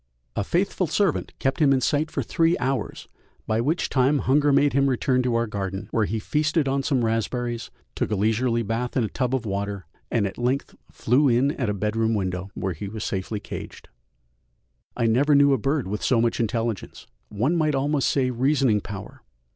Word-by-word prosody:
A - - 0
faithful 185 - 0
servant 195 +1 0
kept 135 +3 -1
him 145 -3 +4
in 135 - +4
sight 150 +4 0
for - - -2
three 165 +1 +2
hours, 130 -3 -3 0.4
by 110 +1 0
which 155 +8 0
time 135 +2 +2
hunger 145 +2 +3
made 140 +1 +3
him 140 +1 +3
return 130 0 +1
to 125 -2 0
our 115 0 +2
garden, 100 -1 -4
where 110 -2 +2
he 110 - -2
feasted 150 +6 0
on 135 +1 +1
some 135 -4 +1
raspberries, 115 +1 -2 0.2
took - - -2
a 105 - 0
leisurely 115 +3 +1
bath 115 +4 -2
in 125 - +2
a - - 0
tub 130 0 -1
of 125 -3 -3
water, 100 -2 -3 0.2
and 115 -4 +1
at 95 - -5
length 125 +3 -1 0.2
flew 135 +5 +2
in 130 +3 +3
at 125 -7 -2
a - - 0
bedroom 110 +3 0
window, 95 -1 -2
where 95 -1 -2
he 90 +6 -6
was 105 +1 -6
safely 100 +2 -3
caged. - - -9 1.1
I 120 - +1
never 135 +6 +3
knew 140 0 +5
a 135 - +1
bird 140 -4 0
with 105 +2 -3
so 125 - +2
much 115 0 +1
intelligence, 115 -2 -2 0.2
one 120 +11 0
might 155 -3 +1
almost 140 +1 +1
say 130 -2 +1
reasoning 130 -3 +2
power. 100 0 -9
125 Hz, 195 wpm, -24 LUFS, 110-140 Hz, 1.1 s, knew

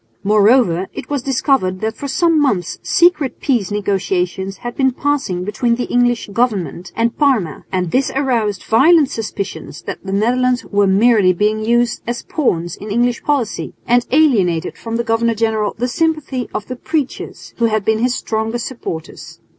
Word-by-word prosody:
Moreover 205 -3 +3
it - - -8
was 285 -3 0
discovered 260 -8 0
that 220 +1 -2
for 285 - -6
some 330 +2 +2
months 200 - 0
secret 330 -6 +2
peace 240 -10 0
negotiations 195 -2 -1
had 240 - -4
been 265 -1 +3
passing 275 -11 -1
between 235 +4 0
the 245 - -2
English 245 -1 +1
government 200 -6 -1
and 230 +1 0
Parma; 240 - 0
and 180 -3 -1
this 265 +6 +1
aroused 230 -8 0
violent 290 +5 +4
suspicions 200 - -5
that - - -6
the 195 - -5
Netherlands 245 +5 +1
were 200 -1 +1
merely 200 -1 +4
being 210 +4 0
used 235 +1 +1
as 240 0 -3
pawns 175 - -1
in 210 - -9
English 240 +3 +1
policy, 270 -7 -2
and 245 0 +2
alienated 215 - +2
from 225 0 -6
the 235 - 0
governor 230 0 +1
general 220 -2 0
the 245 +2 -1
sympathy 305 -3 -1
of 210 - -4
the 255 - -6
preachers, 300 -1 -4
who 235 - +2
had 215 -3 0
been 220 0 +2
his 245 +1 +1
strongest 225 +1 -2
supporters. 165 -11 -7
230 Hz, 165 wpm, -17 LUFS, 200-255 Hz, -, violent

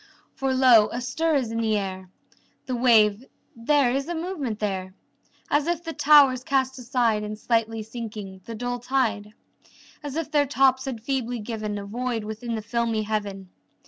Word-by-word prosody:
For 270 -1 -1
lo, 250 -5 +6
a 240 - -3
stir 310 +6 0
is 250 -5 0
in 230 0 -1
the 220 -1 +1
air! 190 -2 -5 0.6
The 255 - -2
wave 225 -3 +4 0.3
there 250 +2 +2
is 275 +3 -1
a 345 - -2
movement 320 - -3
there! 190 -3 -3 0.6
As 290 +1 +2
if 345 -1 -1
the 330 -1 -5
towers 280 -5 +5
cast 265 -1 0
aside 235 -3 +1
In 210 0 -5
slightly 225 0 -1
sinking, 215 -4 -8
the 230 - -7
dull 245 +2 -3
tide; 230 -5 -1 0.7
As 290 -2 -6
if 320 -1 -3
their 290 -2 +3
tops 265 -1 +3
had 240 -5 -5
feebly 245 -2 -2
given 215 -2 -4
A 200 - -6
void 235 +1 -3
within 220 +2 -5
the 220 - -5
filmy 230 -1 -1
heaven. 200 -3 -4
235 Hz, 175 wpm, -25 LUFS, 215-265 Hz, 0.7 s, lo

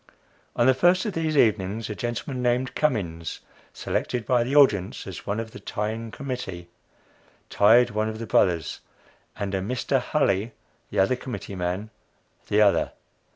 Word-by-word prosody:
On 120 - +3
the 130 - +6
first 175 - +3
of 210 - -2
these 160 -2 -1
evenings, 110 -2 +2
a 105 - -4
gentleman 120 +4 -4
named 125 +1 0
Cummins, 85 - -1 0.3
selected 120 -3 -2
by 125 -2 +3
the 130 +4 -2
audience 105 -10 +3
as - - -8
one 100 +2 -1
of 115 -1 -5
the 125 - -10
Tying 110 +2 -4
Committee, 120 - -6 0.8
tied 120 +4 +5
one 110 +1 0
of 110 - -5
the 115 - -5
Brothers, 85 -8 +1 0.6
and 100 -1 -4
a 95 - 0
Mr. 125 +5 0
Hulley, 115 -7 0 0.4
the - - -6
other 95 +6 +3
committee 125 -5 -7
man, 95 +4 -3 0.6
the 105 +1 +3
other. 100 - +2
110 Hz, 155 wpm, -25 LUFS, 100-125 Hz, 0.8 s, the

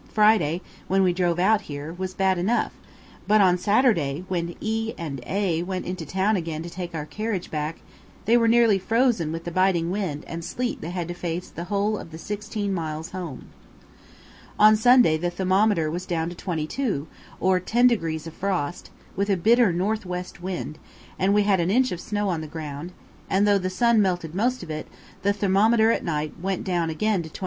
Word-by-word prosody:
Friday, 210 -7 +3 0.3
when 195 0 +3
we 180 -1 +3
drove 175 -1 +1
out 205 +4 +3
here, 145 -2 -7
was 185 +1 -5
bad 190 -2 +2
enough; 220 +7 +1 0.6
but 215 +1 +5
on 185 -3 +5
Saturday, 185 - +2
when 170 -2 -2
E 225 +1 -2
and 145 -6 -5
A 190 -4 0
went 185 +1 -4
into 180 -4 -5
town 195 +6 +1
again 165 -3 -3
to 170 - -8
take 175 -1 -6
our 150 -2 -3
carriage 210 +1 -4
back, 155 +1 -3 0.4
they 230 - +4
were 230 -1 +4
nearly 230 -3 +5
frozen 225 -5 +1
with 165 +1 -5
the 175 - -5
biting 180 -2 +2
wind 185 -7 -3
and 165 0 -6
sleet 240 +8 -3
they 160 - -5
had 175 -2 -3
to 175 - -4
face 175 0 -4
the 170 - -6
whole 205 +2 0
of - - -9
the 160 - -8
sixteen 205 +2 -4
miles 160 -2 -4
home. 175 -9 -7 1.1
On 215 +1 +7
Sunday 240 -7 +5
the 175 +2 -1
thermometer 185 -2 +2
was 180 +3 -5
down 165 -1 -1
to 175 - -8
22, 170 - -2 0.3
or 185 0 +3
ten 235 +7 +2
degrees 165 -10 +1
of 165 - -8
frost, 180 -3 -3 0.3
with 200 +2 -1
a 195 - +3
bitter 230 +3 +4
north 205 +6 -1
west 180 -1 -6
wind, 175 -4 -5 0.4
and 190 +1 +3
we 205 0 +4
had 200 -2 +3
an 170 +1 +1
inch 255 +5 +3
of 175 - -4
snow 205 -1 -2
on 170 -4 -1
the 155 - -6
ground; 155 +1 -6 0.4
and 200 +2 +3
though 200 -1 +4
the 185 0 -2
sun 230 +4 +3
melted 175 -5 -1
most 240 +4 0
of 165 - -7
it, 155 0 -5 0.3
the 200 - +2
thermometer 215 +3 +3
at - - -1
night 155 -2 -2
went 190 0 -2
down 175 -3 0
again 200 +4 0
to 160 - -8
24. - - -10
185 Hz, 200 wpm, -24 LUFS, 165-210 Hz, 1.1 s, On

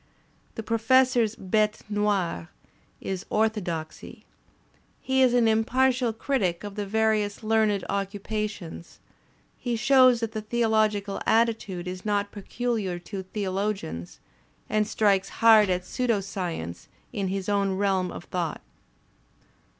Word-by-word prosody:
The 225 - -5
Professor's 230 0 +3
bite 210 +2 0
noir 205 - -1 0.5
is 190 -1 -4
orthodoxy. 200 -8 -2 0.7
He 265 0 +1
is 250 -2 +4
an 240 -2 +4
impartial 245 +2 +2
critic 215 -7 -1
of 205 -1 -6
the 205 -1 -4
various 215 0 0
learned 215 -2 +2
occupations; 200 -3 -4 0.6
he 245 -2 -2
shows 255 +1 +5
that 225 -1 -2
the 220 -1 -4
theological 215 -3 0
attitude 220 -6 +1
is 180 0 -6
not 205 -1 0
pecuUar 205 -4 -3
to 195 +1 -6
theologians, 190 - -4 0.5
and 215 -1 +1
strikes 200 -3 +2
hard 220 -3 +5
at 180 0 -1
pseudo 240 -5 0
science 170 - -5 0.3
in 195 -2 -2
his 190 0 -3
own 200 -2 +1
realm 190 -2 +1
of - - -8
thought. 175 -4 -3
210 Hz, 120 wpm, -26 LUFS, 190-225 Hz, 0.7 s, shows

